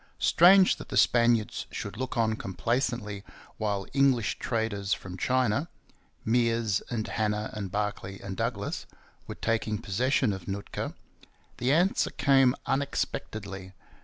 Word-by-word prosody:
Strange 185 +2 +6
that - - -10
the 130 - -2
Spaniards 115 0 +3
should 100 - -6
look 130 +2 -4
on 110 -1 +2
complaisantly 110 0 -2 0.3
while 100 -3 -1
English 135 -5 +2
traders 105 -4 -1
from 90 -1 -9
China 130 - +1 0.6
Meares 115 -3 +2
and 115 -2 -2
Hanna 105 -1 -1
and 100 -3 -4
Barkley 100 -1 -3
and 95 -1 -6
Douglas 115 -2 -3 0.4
were - - -6
taking 110 -1 -1
possession 115 +3 +1
of 95 -3 -8
Nootka. 100 +1 -4 0.6
The 125 +3 +1
answer 175 +6 +3
came 130 -1 +4
unexpectedly. 100 -8 -3
110 Hz, 125 wpm, -28 LUFS, 100-125 Hz, 0.6 s, Strange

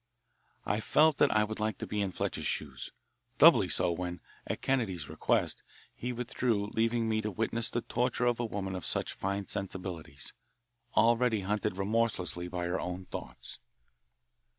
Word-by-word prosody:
I 105 - +1
felt 150 +6 +4
that - - +5
I 110 -1 +3
would 110 +1 -4
like 110 0 -1
to - - -4
be 105 - -2
in 100 - 0
Fletcher's - - -2
shoes - - -3 0.5
doubly - - +7
so 85 - +2
when, 90 +1 -3 0.3
at - - -3
Kennedy's 95 - 0
request, - - 0 0.3
he 125 - -4
withdrew, 115 -4 -1
leaving 115 0 +2
me 110 -1 +1
to 105 - -2
witness 110 +2 0
the 120 - -1
torture 125 +1 0
of 120 -1 +2
a 120 - 0
woman 100 -3 -3
of 90 - -4
such - - 0
fine 100 +1 -2
sensibilities, 90 -8 -5 0.6
already 115 -2 +4
hunted 105 0 -1
remorselessly 95 -4 0
by 90 0 -3
her 90 +1 -1
own 90 +1 -4
thoughts. - - -7
105 Hz, 160 wpm, -31 LUFS, 95-115 Hz, 0.6 s, doubly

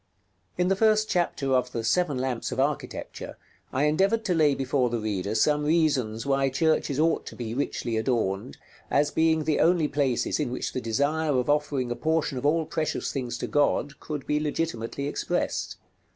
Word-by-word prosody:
§ - - -46 0.5
LI. 180 - +2
In - - +1
the 195 - +3
first 215 +1 +3
chapter 155 -6 0
of 125 -1 +1
the 115 - -2
"Seven 145 +5 +1
Lamps 125 -2 -2
of - - -3
Architecture" 145 +2 -3 0.3
I 130 - 0
endeavored 195 +9 +2
to 185 - +1
lay 150 -4 +3
before 130 -2 0
the 120 - -1
reader 105 -2 -2
some 150 +6 +2
reasons 145 -8 +1
why 135 -1 +2
churches 145 0 +1
ought 165 +1 +1
to - - -8
be 115 -2 -5
richly 120 -3 -2
adorned, 110 - -1 0.3
as 145 0 +2
being 160 -1 +2
the 155 0 +1
only 170 -2 +3
places 140 -3 0
in 145 -5 0
which 125 - -4
the 130 - -2
desire 145 +5 0
of 125 +3 +1
offering 145 -4 0
a - - -1
portion 155 0 0
of 140 - 0
all 160 +1 +2
precious 155 0 -2
things 125 -3 -3
to - - -3
God 145 0 +1
could 150 -3 -5
be 150 - +1
legitimately 145 -4 -2
expressed. - - -2
145 Hz, 190 wpm, -26 LUFS, 125-155 Hz, 0.5 s, the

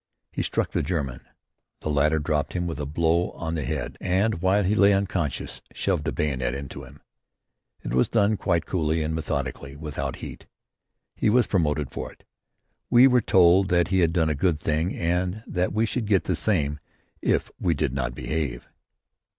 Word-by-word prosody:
He - - -2
struck - - -1
the - - 0
German. 70 -6 -3 0.6
The 75 - -2
latter 75 +2 +3
dropped 75 -1 -1
him 90 -1 -1
with 85 -3 -4
a 75 - -3
blow 85 +3 +1
on 80 0 -4
the 80 -3 -2
head, - - -4
and 95 0 +1
while 95 +2 +3
he 95 +3 +1
lay 100 -1 +5
unconscious 95 -7 -2
shoved 90 -6 -1
the 80 - 0
bayonet 65 -5 -1
into 70 -1 -7
him. - - -14 0.8
It - - -4
was 65 - +3
done 110 -1 +3
quite 85 -5 0
coolly 80 -2 0
and 80 +1 -2
methodically, 70 -3 -3
without 70 -3 -4
heat. - - -9 0.7
He - - +1
was 120 +3 +4
promoted 75 - 0
for - - -5
it. - - -22 0.7
We 125 +1 +7
were 125 -2 +5
told 95 -1 +5
that 85 -1 +2
he 95 - +2
had 85 -2 +3
done 80 -2 +2
a - - +1
good 75 +2 +1
thing 80 +4 -1
and 90 +4 -1
that 90 0 -1
we 110 +3 +1
should 115 -1 -2
get 100 -3 +3
the 90 - 0
same 75 -7 0 0.4
if - - 0
we 85 -3 +1
did 70 -2 -1
not 65 -2 -2
behave. 70 -6 -3
80 Hz, 185 wpm, -25 LUFS, 75-95 Hz, 0.8 s, We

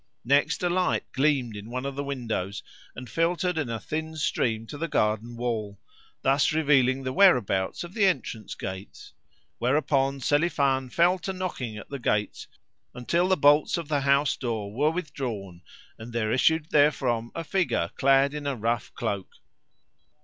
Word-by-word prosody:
Next, 140 +7 +2
a 175 - +2
light 180 0 +1
gleamed 135 -5 +1
in 105 +2 -8
one 125 +2 -4
of 140 - -3
the 140 - -3
windows, 115 -8 -3 0.3
and 125 0 -8
filtered 175 +3 0
in 150 -6 -2
a 115 -1 -3
thin 160 +7 -4
stream 115 -7 -1
to 145 - -8
the 165 - -1
garden 110 -3 0
wall 110 -4 -3 0.5
thus 135 +3 +3
revealing 135 -4 +3
the 130 0 -3
whereabouts 120 - +3
of 175 +1 -9
the 205 -2 +2
entrance 115 - -2
gates; 95 +1 -8 0.5
whereupon 135 +1 +1
Selifan 140 -2 +1
fell 175 +7 +3
to 190 - -4
knocking 155 - -4
at - - -10
the 140 - -5
gates 105 -3 -1 0.5
until 170 +9 +1
the 190 0 +2
bolts 145 +3 +4
of 165 -3 -6
the 145 -2 +1
house 140 0 +3
door 110 -5 -4
were 145 +6 +2
withdrawn 120 - -5 0.4
and 115 +1 -9
there 110 -2 0
issued 160 +5 +2
therefrom 130 -6 +2
a 165 - -3
figure 155 - 0
clad 135 +1 +3
in 150 -1 -5
a 140 - -1
rough 115 0 -2
cloak. 100 -2 -3
135 Hz, 165 wpm, -26 LUFS, 115-155 Hz, 0.5 s, bolts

